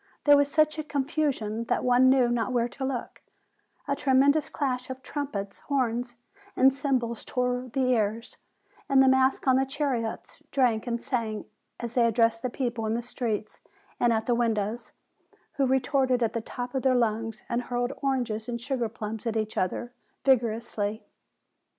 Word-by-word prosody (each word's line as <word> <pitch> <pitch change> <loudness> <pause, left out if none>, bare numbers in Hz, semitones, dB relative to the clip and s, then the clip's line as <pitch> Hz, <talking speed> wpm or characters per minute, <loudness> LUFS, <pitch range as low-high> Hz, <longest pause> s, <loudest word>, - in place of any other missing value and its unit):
There 290 -1 +7
was 285 0 +3
such 310 0 +2
a - - -2
confu 300 +1 0
sion 220 -2 -4
that - - 0
one 250 +1 +5
knew 260 -2 +4
not 240 +1 0
where 240 -1 +1
to 255 +2 -8
look: 265 -2 -4 0.7
a 280 - +1
tremendous 280 +3 +3
clash 255 -4 -2
of 260 0 -7
trumpets, 220 -11 -4
horns, 245 -3 -1 0.4
and 265 +1 +5
cymbals 255 -5 -1
tore 250 0 -1
the 265 +2 0
ears; 225 0 -1 0.5
and 275 -1 +5
the - - +4
masks 265 +1 +3
on 260 0 +5
the 265 - +3
chariots 265 -5 -3
drank 245 -4 +1
and 235 0 -1
sang, 225 -4 -3 0.3
as 235 -1 -5
they 240 -2 +4
addressed 230 0 +2
the 255 - -1
people 240 -3 -2
in 220 - 0
the 240 - -2
streets 225 -4 -4 0.4
and 240 - +3
at 220 -1 0
the 245 - +2
windows, 225 -1 -1 0.7
who 275 -2 +3
retorted 260 -1 +2
at 225 - 0
the 230 - -2
top 245 +2 -6
of 265 - 0
their 260 -1 +3
lungs, 225 -2 -1
and 235 +1 -1
hurled 245 +1 -1
oranges 245 -5 -1
and 235 -1 -3
sugar 245 -2 -2
plums 220 +1 -6
at 225 -1 0
each 215 0 -2
other 240 +6 -2 0.3
vigorously. 225 -4 +1
245 Hz, 175 wpm, -27 LUFS, 230-265 Hz, 0.7 s, There